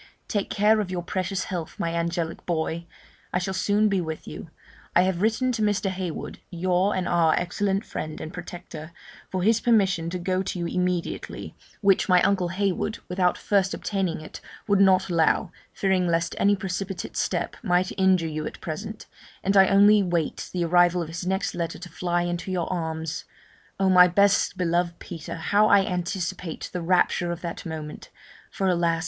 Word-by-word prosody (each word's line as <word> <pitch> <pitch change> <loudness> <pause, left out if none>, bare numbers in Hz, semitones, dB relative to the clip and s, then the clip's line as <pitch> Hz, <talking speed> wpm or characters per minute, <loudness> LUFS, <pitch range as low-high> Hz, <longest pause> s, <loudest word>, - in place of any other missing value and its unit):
Take 205 -3 -1
care 215 +2 +3
of 205 -3 -2
your 180 -2 -3
precious 185 +1 -2
health, 175 -4 -5
my 165 0 -1
angelic 170 0 -2
boy. 170 0 -2 0.4
I - - +1
shall 190 +1 -2
soon 205 +3 +2
be 195 -3 +1
with 160 -2 -6
you; - - -8 0.5
I 175 - +6
have 185 -1 0
written 225 +4 +2
to 230 - -2
Mr. 205 -2 +1
Heywood 185 -3 -5
(your 185 +3 +1
and 185 -1 -1
our 165 -2 +3
excellent 195 +3 -1
friend 155 0 -5
and 160 - -7
protector) 170 -2 -8 0.4
for 185 -1 -2
his 225 +2 +3
permission 190 -8 +2
to 180 - -3
go 185 +1 -1
to 190 - -4
you 170 - -2
immediately, 180 0 -2 0.3
which 195 -2 +3
my 180 -1 +6
uncle 190 -3 +2
Heywood, 200 +3 -1
without 180 -1 +1
first 195 -2 +1
obtaining 190 -6 -2
it, 155 - -10 0.3
would 200 -2 +3
not 190 -1 +5
allow, 170 +1 +2 0.2
fearing 190 -2 +1
lest 170 0 0
any 205 0 +4
precipitate 190 0 -4
step - - -1
might 185 -4 +1
injure 190 -3 +3
you 155 -1 -3
at - - -8
present; 210 +7 -6 0.4
and 195 +2 +1
I 190 -1 +7
only 205 +1 +6
wait 175 -4 -2
the 175 -2 -1
arrival 175 +1 +4
of 160 - -8
his 170 +2 -5
next 190 +1 -1
letter 170 -1 -3
to 180 +1 -9
fly 175 +1 -1
into 175 +2 -3
your 180 -3 -1
arms. 160 -1 -3 0.5
Oh! 195 - +3
my 180 -1 +8
best 200 +3 +3
beloved 175 -1 0
Peter, 165 -4 -7
how 205 +6 +3
I 200 -2 +5
anticipate 180 -1 -3
the 180 - -2
rapture 175 0 +2
of 170 - -5
that 170 0 -5
moment! 155 -2 -7 0.4
for 195 - -2
alas! 170 -2 +2
180 Hz, 180 wpm, -25 LUFS, 170-195 Hz, 0.5 s, my